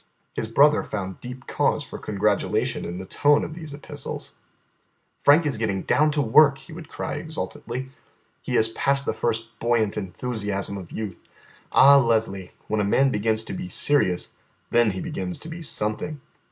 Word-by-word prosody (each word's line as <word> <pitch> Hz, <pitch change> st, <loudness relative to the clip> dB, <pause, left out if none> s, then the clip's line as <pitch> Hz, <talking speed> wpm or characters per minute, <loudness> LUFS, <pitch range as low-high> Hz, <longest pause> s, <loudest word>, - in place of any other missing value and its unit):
His 110 Hz, -, -3 dB
brother 145 Hz, +6 st, +5 dB
found 95 Hz, -3 st, -5 dB
deep 125 Hz, 0 st, -8 dB
cause -, -, 0 dB
for -, -, -9 dB
congratulation 105 Hz, 0 st, 0 dB
in 85 Hz, -, -5 dB
the 95 Hz, -, -6 dB
tone 145 Hz, +9 st, +3 dB
of 155 Hz, -, -5 dB
these 160 Hz, -2 st, -8 dB
epistles. 140 Hz, +1 st, -8 dB, 0.9 s
"Frank 150 Hz, +4 st, +6 dB
is 135 Hz, -7 st, -1 dB
getting 100 Hz, -4 st, -1 dB
down 155 Hz, +1 st, +3 dB
to 145 Hz, -1 st, +1 dB
work," 140 Hz, +4 st, +6 dB
he 135 Hz, +5 st, -13 dB
would 160 Hz, -1 st, -10 dB
cry -, -, -4 dB
exultantly. 130 Hz, -5 st, -4 dB, 0.5 s
"He -, -, -1 dB
is 110 Hz, -, +3 dB
past 140 Hz, +4 st, +1 dB
the -, -, 0 dB
first 115 Hz, -1 st, -2 dB
buoyant 115 Hz, -3 st, +1 dB
enthusiasm 100 Hz, 0 st, -3 dB
of 95 Hz, -4 st, -8 dB
youth. 105 Hz, -5 st, -5 dB, 0.5 s
Ah, 140 Hz, +1 st, +8 dB
Leslie, 110 Hz, -6 st, 0 dB, 0.2 s
when 110 Hz, 0 st, 0 dB
a -, -, +1 dB
man 135 Hz, +7 st, +3 dB
begins 110 Hz, +1 st, +1 dB
to -, -, -7 dB
be 180 Hz, 0 st, -5 dB
serious, 115 Hz, -, +2 dB, 0.4 s
then 120 Hz, -1 st, +4 dB
he 95 Hz, -2 st, -4 dB
begins 90 Hz, -2 st, -4 dB
to -, -, -10 dB
be 165 Hz, +1 st, -7 dB
something." 145 Hz, +2 st, -1 dB
115 Hz, 170 wpm, -24 LUFS, 105-145 Hz, 0.9 s, Ah